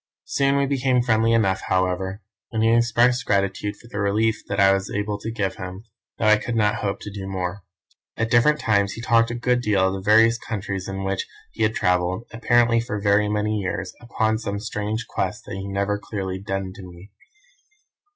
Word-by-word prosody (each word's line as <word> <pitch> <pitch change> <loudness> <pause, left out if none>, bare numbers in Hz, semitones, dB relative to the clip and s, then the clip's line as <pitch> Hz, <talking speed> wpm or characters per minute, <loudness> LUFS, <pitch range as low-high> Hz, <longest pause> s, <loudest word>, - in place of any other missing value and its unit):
Soon 140 0 +1
we 140 - +2
became 130 -2 +1
friendly 115 -1 +2
enough, 100 -5 +2
however, 95 +2 -1 0.3
and 110 -1 0
he 115 +1 +4
expressed 120 +1 +3
gratitude 100 0 -1
for 115 - -16
the 105 -4 -6
relief 105 +2 +1
that 100 0 -2
I 95 0 +6
was 95 0 -2
able 105 0 -2
to 110 - -5
give 100 -4 -2
him, 95 +2 -7 0.3
though - - -1
I 110 0 +6
could 120 - -4
not 105 -2 +2
hope 100 -1 -2
to 105 - -7
do 95 -1 -6
more. 95 +1 -3 0.6
At 115 0 -1
different 150 +6 +4
times 100 -2 +1
he 115 - -7
talked 115 0 +3
a 120 - -3
good 125 0 +1
deal 105 -5 +2
of 95 - -1
the 95 - -4
various 115 +3 +5
countries 100 -4 -4
in 95 0 -4
which 95 -1 -2 0.2
he - - -8
had 110 +1 +2
travelled, 90 +2 +1
apparently 120 0 +3
for 115 -3 -3
very 100 +1 +2
many 105 0 0
years, 90 -1 -3
upon 110 -2 0
some 100 -3 -3
strange 110 +1 -3
quest 95 +2 -3
that 100 - -7
he 95 0 -5
never 100 +1 -1
clearly 95 -3 -4
defined 95 -1 -4
to - - -9
me. 90 +2 -13
105 Hz, 200 wpm, -23 LUFS, 95-115 Hz, 0.6 s, I